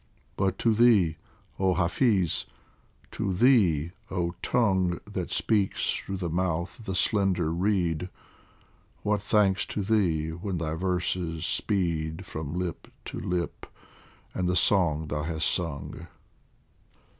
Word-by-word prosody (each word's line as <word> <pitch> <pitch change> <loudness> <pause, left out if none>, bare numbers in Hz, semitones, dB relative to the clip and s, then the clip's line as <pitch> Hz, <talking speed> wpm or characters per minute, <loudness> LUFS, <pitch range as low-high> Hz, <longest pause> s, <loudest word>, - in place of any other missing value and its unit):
But 95 -1 0
to 115 - +2
thee, 105 -8 +4 0.4
oh 95 -1 +2
Hafiz, 95 - +1 0.6
to 95 -2 -2
thee, 90 - +4 0.2
oh 85 -2 -1
Tongue 95 -7 +1
That - - -4
speaks 105 -3 +1
through 95 - -4
the 90 -2 -3
mouth 85 +2 -1
of 115 - -11
the 95 - -2
slender 95 -4 +2
reed, 90 -2 0 0.9
What 105 -1 +1
thanks 100 -2 +2
to 105 - -3
thee 90 -7 +1
when 90 +3 -4
thy 80 -2 -2
verses 90 -2 -1
speed 80 -5 0
From 80 +1 -5
lip 90 -3 -4 0.2
to - - -5
lip, 90 -1 -3 0.7
and 90 -1 -1
the 90 - +1
song 85 -4 +3
thou 75 0 -3
hast 80 +1 -1
sung 80 -5 -2
90 Hz, 125 wpm, -27 LUFS, 80-100 Hz, 0.9 s, thee